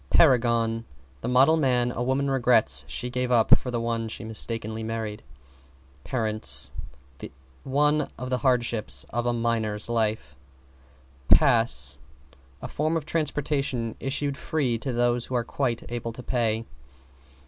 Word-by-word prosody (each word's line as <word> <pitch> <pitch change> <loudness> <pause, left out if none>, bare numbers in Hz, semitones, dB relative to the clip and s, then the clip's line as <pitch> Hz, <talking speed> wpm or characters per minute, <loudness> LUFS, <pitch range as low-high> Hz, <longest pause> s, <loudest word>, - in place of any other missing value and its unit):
=PARAGON= 115 -5 +3 0.4
The - - -4
model 130 +6 +4
man 125 -4 +1
a 120 - -5
woman 130 +3 0
regrets 120 - +3
she 125 0 -5
gave 125 0 -2
up 115 -2 +6
for 125 - -5
the 120 -1 -2
one 115 -1 -2
she 110 - -7
mistakenly 110 0 -4
married. 110 -1 -4 0.8
=PARENTS= 110 - +2 0.9
One 150 +2 +1
of 125 +1 -6
the 125 - 0
hardships 120 -4 0
of 120 +1 -2
a - - +2
minor's 115 -2 -1
life. 110 - -1 0.9
=PASS= 120 -6 +4 0.6
A - - -4
form 155 +2 -1
of 155 - -5
transportation 140 -7 -1
issued 140 +1 -2
free 130 -7 -1
to 130 - -4
those 120 0 +1
who 130 - -5
are 120 - +1
quite 120 -2 -2
able 115 -1 -4
to 125 - -9
pay. 115 -3 -1
120 Hz, 135 wpm, -25 LUFS, 115-130 Hz, 0.9 s, up